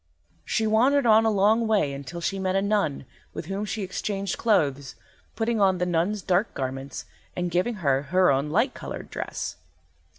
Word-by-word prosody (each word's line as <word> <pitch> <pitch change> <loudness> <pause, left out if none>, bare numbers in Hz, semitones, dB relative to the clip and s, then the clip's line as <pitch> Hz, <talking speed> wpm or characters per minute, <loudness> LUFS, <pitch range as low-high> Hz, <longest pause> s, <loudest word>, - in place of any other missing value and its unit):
She 220 - 0
wandered 250 +6 +3
on 220 0 +5
a - - +4
long 215 +3 +3
way 200 -11 +2
until 140 +5 -7
she 195 +3 -2
met 190 0 -1
a 195 - +3
nun, 200 -10 0 0.3
with 160 - -5
whom 195 +4 -3
she 210 0 -3
exchanged 195 0 -3
clothes, 140 - 0 0.4
putting 225 -1 0
on 190 -2 +4
the 180 - 0
nun's 180 +4 0
dark 185 +5 +1
garments 135 0 -5 0.3
and 175 -1 -2
giving 185 +7 0
her 135 -1 +3
her 180 +4 +3
own 140 +2 0
light 230 - +1
coloured - - -8
dress. - - -5
190 Hz, 175 wpm, -25 LUFS, 155-215 Hz, 0.4 s, on